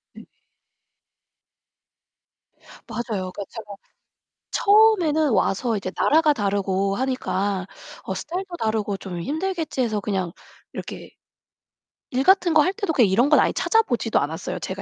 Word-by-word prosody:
네 - - -12 2.6
맞아요. 205 -6 -4
그러니까 200 - -6
제가 210 -3 -9 0.8
처음에는 365 - +4
와서 220 +2 +1
이제 185 -1 -5
나라가 310 0 +4
다르고 195 -3 0
하니까 200 -7 -2 0.4
어 190 - -4
스타일도 355 - -5
다르고 215 -3 -1
좀 180 -3 -7
힘들겠지 320 - -2
해서 215 -4 0
그냥 190 -4 -2 0.4
이렇게 - - -8 1.0
일 260 +2 0
같은 365 -2 +4
거 310 - +6
할 370 +5 +1
때도 405 -7 -2
그냥 235 -9 +4
이런 240 +9 +3
건 300 - +6
아예 - - +3
찾아보지도 250 - +1
않았어요. 160 +5 -4
제가 190 +1 -5
235 Hz, 290 characters per minute, -23 LUFS, 195-315 Hz, 2.6 s, 거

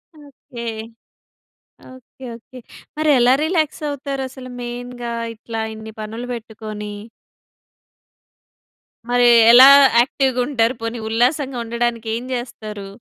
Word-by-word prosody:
Okay. 280 -5 -12 1.3
Okay 260 +1 -17
okay. 250 +3 -14 0.4
మరి 310 0 +1
ఎలా 245 +1 +5
relax 315 -2 -1
అవుతారు 280 -1 -5
అసలు 255 0 -11
మెయిన్‌గా? 245 0 -6 0.2
ఇట్లా 225 0 -6
ఇన్ని 220 0 -10
పనులు 225 +3 -6
పెట్టుకొని? 215 -2 -8 2.2
మరి 245 0 +4 0.2
ఎలా 255 +3 +10 0.3
యాక్టివ్‌గా 260 0 +1
ఉంటారు? 240 -4 +1
పోనీ 230 +1 -4
ఉల్లాసంగా 255 +4 0
ఉండడానికి 235 -1 -2
ఏం 235 - -5
జేస్తారు? 215 -5 -6
240 Hz, 100 wpm, -19 LUFS, 225-260 Hz, 2.2 s, ఎలా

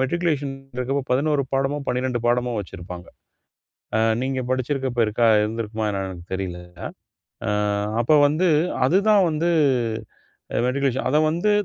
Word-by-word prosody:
Matriculation 145 -1 0 0.2
இருக்கப்போ 135 +2 -1
11 140 +2 +2
பாடமோ, 135 +2 0
12 125 0 0
பாடமோ 120 0 +1
வச்சிருப்பாங்க. 90 -1 -9 0.9
ஆ. - - +2 0.2
நீங்க 130 0 -1
படிச்சிருக்கப்போ 130 -1 -1
இருக்கா 115 +2 +2 0.2
இருந்திருக்குமா 110 0 -3
என்னனு 95 -1 -3
எனக்கு 90 -2 -9
தெரில. 95 -2 -3 0.9
ஆ - - -1 0.5
அப்போ 135 +6 +3
வந்து 155 +6 +1 0.4
அதுதான் 200 +6 +4
வந்து 155 +3 0 1.2
மெட்ரிகுலேஷன் 135 0 0
அத 150 - +3
வந்து 175 +6 +1
130 Hz, 120 wpm, -23 LUFS, 115-145 Hz, 1.2 s, அதுதான்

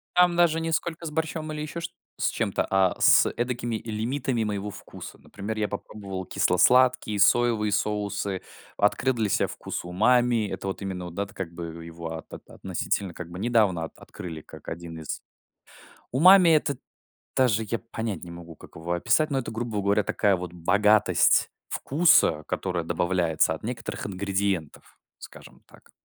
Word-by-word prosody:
Там 180 -1 +5
даже 165 -2 +3
ни 165 - -2
сколько 165 +1 -2
с 155 - -4
борщом 155 0 -3
или 150 - -4
ещё 155 +3 -5
чт - - -5 0.3
с - - +1
чем-то, - - -1
а 95 -1 +3
с - - +6
эдакими 120 -1 -2
лимитами 115 +2 -1
моего 105 -1 -3
вкуса. - - -10
Например, 105 +2 -7
я 105 -1 0
попробовал 100 -2 -6
кисло-сладкие, 125 +4 +3
соевые 105 0 +3
соусы, 100 -2 -1 0.4
открыл 125 +6 +2
для 110 -2 0
себя - - +1
вкус - - -6
умами. 115 +5 +2
Это 100 - -5
вот 95 - -4
именно, 95 -2 -4
вот 85 -1 -9
да 100 - 0
вот 100 - -11
как 90 -3 -5
бы 85 -1 -7
его 85 0 -7
от - - -12 0.2
относительно 95 -3 -3
как 85 0 -8
бы 90 - -8
недавно 105 -6 +2
от 80 - -8
открыли 80 -3 -8
как - - -11
один 85 0 -7
из 80 - -5 0.9
Умами 180 +6 +7
это 150 -4 +3 0.6
даже 115 -4 +3
я 115 - -1
понять 110 -6 -5
не 85 - -9
могу, 85 -1 -10
как - - -15
его 80 +2 -6
описать, 155 - +2
но 135 - +1
это 120 - -5
грубо 110 -2 -3
говоря 100 +1 +2
такая 100 0 +2
вот 90 -1 -6
богатость 100 +1 +3 0.2
вкуса, 135 - +3
которая 90 -3 -2
добавляется 85 -2 +1
от 80 - -9
некоторых 115 +2 -5
ингредиентов, 95 -4 -3 0.2
скажем - - -13
так. - - -20
105 Hz, 165 wpm, -26 LUFS, 90-125 Hz, 0.9 s, Умами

